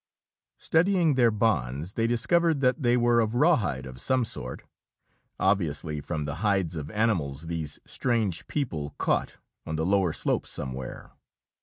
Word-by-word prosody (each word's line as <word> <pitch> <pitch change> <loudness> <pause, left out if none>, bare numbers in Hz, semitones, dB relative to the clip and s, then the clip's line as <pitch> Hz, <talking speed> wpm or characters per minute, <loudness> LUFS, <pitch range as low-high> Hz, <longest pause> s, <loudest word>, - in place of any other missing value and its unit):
Studying 170 -1 +2
their 125 -3 +4
bonds, 85 - 0
they 115 0 +1
discovered 160 +7 +2
that 130 +3 +2
they 120 -1 +3
were 120 -1 +3
of 110 0 0
rawhide 120 - +2
of 65 0 -7
some 130 -2 +2
sort, 65 - -5 0.8
obviously 75 -5 0
from 75 -1 -3
the 75 +1 -4
hides 95 -6 +1
of 75 -2 -5
animals 85 -10 0
these 80 -3 -3
strange 110 -9 -1
people 80 - -3
caught - - 0 0.3
on 80 - -4
the 80 +1 -1
lower 95 -2 +2
slopes - - -1
somewhere. 65 0 -6
100 Hz, 145 wpm, -27 LUFS, 75-120 Hz, 0.8 s, their